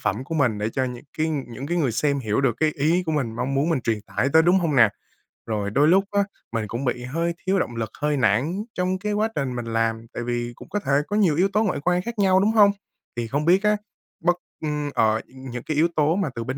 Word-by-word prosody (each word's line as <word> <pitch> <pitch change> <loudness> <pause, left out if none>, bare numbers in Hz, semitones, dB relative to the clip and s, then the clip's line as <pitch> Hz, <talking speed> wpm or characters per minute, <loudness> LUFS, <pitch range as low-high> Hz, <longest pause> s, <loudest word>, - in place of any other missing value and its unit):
phẩm 120 +6 -1
của 165 - -5
mình 125 -9 +1
để 105 +1 -1
cho 130 - 0
những 125 0 -6
cái 160 +1 +1
những 135 -3 -4
cái 175 - -1
người 135 -8 +1
xem 140 +3 +1
hiểu 110 -1 0
được 120 -4 +1
cái 155 - +3
ý 160 +6 +2
của 160 - 0
mình 130 -7 -1
mong 130 +3 -2
muốn 145 +5 +1
mình 155 -6 +1
truyền 110 -3 -1
tải 125 +5 -1
tới 160 0 +7
đúng 175 +3 +4
hông 165 -6 0
nè? 115 -4 +7 0.6
Rồi 105 -3 -2
đôi 145 +7 +4
lúc 190 +3 +5
á, 200 0 +3 0.3
mình 115 -2 -2
cũng 120 +5 -4
bị 125 0 -1
hơi 165 +7 -1
thiếu 195 +1 +2
động 120 - -2
lực, 115 -2 -3
hơi 150 -1 +1
nản 130 - +1
trong 185 +1 -1
cái 210 +1 -2
quá 210 +1 +1
trình 130 -3 -2
mình 120 - -4
làm, 115 0 -1
tại 120 - -4
vì 120 0 -2
cũng - - -13
có 205 - -1
thể 140 - -3 0.2
có 205 - -2
nhiều 185 -8 +3
yếu 185 +4 +3
tố 215 - +3
ngoại 185 -8 -1
quan 180 +1 +2
khác 230 +2 -6
nhau, 190 -2 +4
đúng 205 +3 +3
hông? 210 -2 +6 0.4
Thì 120 -1 -3
không 145 +6 -1
biết 185 +4 +4
á, 210 0 +3 0.4
bất 175 +1 +2 0.3
ưm, 150 -1 -2
ờ, 110 0 +2
những 130 -2 -8
cái 155 - -3
yếu 165 +3 +4
tố 155 +2 +3
mà 190 -6 0
từ 115 - -3
bên 130 +3 -4
145 Hz, 270 wpm, -24 LUFS, 120-175 Hz, 0.6 s, tới